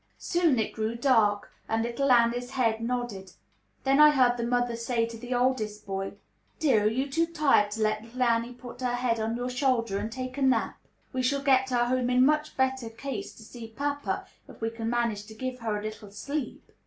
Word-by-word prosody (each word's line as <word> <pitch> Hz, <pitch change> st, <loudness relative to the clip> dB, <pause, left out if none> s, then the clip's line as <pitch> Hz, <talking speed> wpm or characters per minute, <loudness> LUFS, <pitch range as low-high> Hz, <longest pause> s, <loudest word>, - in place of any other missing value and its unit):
Soon 345 Hz, -6 st, +1 dB
it 220 Hz, -, -1 dB
grew 220 Hz, +1 st, -2 dB
dark, 225 Hz, -5 st, +2 dB, 0.2 s
and 225 Hz, 0 st, +1 dB
little 240 Hz, +4 st, 0 dB
Annie's 245 Hz, 0 st, +3 dB
head 230 Hz, -4 st, 0 dB
nodded. 230 Hz, -6 st, -3 dB, 0.5 s
Then 270 Hz, +1 st, +3 dB
I 300 Hz, 0 st, +9 dB
heard 255 Hz, -4 st, +4 dB
the 235 Hz, -, -3 dB
mother 245 Hz, 0 st, 0 dB
say 230 Hz, 0 st, 0 dB
to 230 Hz, 0 st, -8 dB
the 245 Hz, +2 st, -4 dB
oldest 225 Hz, -4 st, 0 dB
boy, 195 Hz, 0 st, -4 dB, 0.4 s
"Dear, 245 Hz, -9 st, +3 dB
are -, -, +5 dB
you 260 Hz, +5 st, -1 dB
too 330 Hz, +4 st, +1 dB
tired 295 Hz, -10 st, +3 dB
to 220 Hz, 0 st, -1 dB
let 215 Hz, 0 st, +1 dB
little 245 Hz, +3 st, -3 dB
Annie 235 Hz, 0 st, +1 dB
put 245 Hz, 0 st, -11 dB
her 245 Hz, -1 st, 0 dB
head 245 Hz, -2 st, 0 dB
on 220 Hz, +1 st, -1 dB
your 250 Hz, +1 st, -3 dB
shoulder 245 Hz, -6 st, +1 dB
and 215 Hz, +2 st, -4 dB
take 255 Hz, +2 st, -5 dB
a -, -, -4 dB
nap? 265 Hz, -1 st, +1 dB, 0.3 s
We 255 Hz, -, 0 dB
shall 275 Hz, +2 st, 0 dB
get 265 Hz, -1 st, +3 dB
her 240 Hz, -1 st, +2 dB
home 250 Hz, 0 st, 0 dB
in 250 Hz, +1 st, +5 dB
much 305 Hz, +1 st, +1 dB
better 265 Hz, -3 st, 0 dB
case 225 Hz, -2 st, -6 dB
to 220 Hz, -, -13 dB
see 225 Hz, +1 st, -9 dB
papa 285 Hz, +5 st, -3 dB, 0.2 s
if -, -, -14 dB
we 225 Hz, 0 st, -2 dB
can 225 Hz, 0 st, -4 dB
manage 230 Hz, -4 st, -1 dB
to 220 Hz, -, -11 dB
give 255 Hz, +2 st, -4 dB
her 220 Hz, -2 st, -2 dB
a 205 Hz, -, -6 dB
little 215 Hz, -1 st, -7 dB
sleep." 280 Hz, +7 st, -5 dB
245 Hz, 215 wpm, -28 LUFS, 225-260 Hz, 0.5 s, I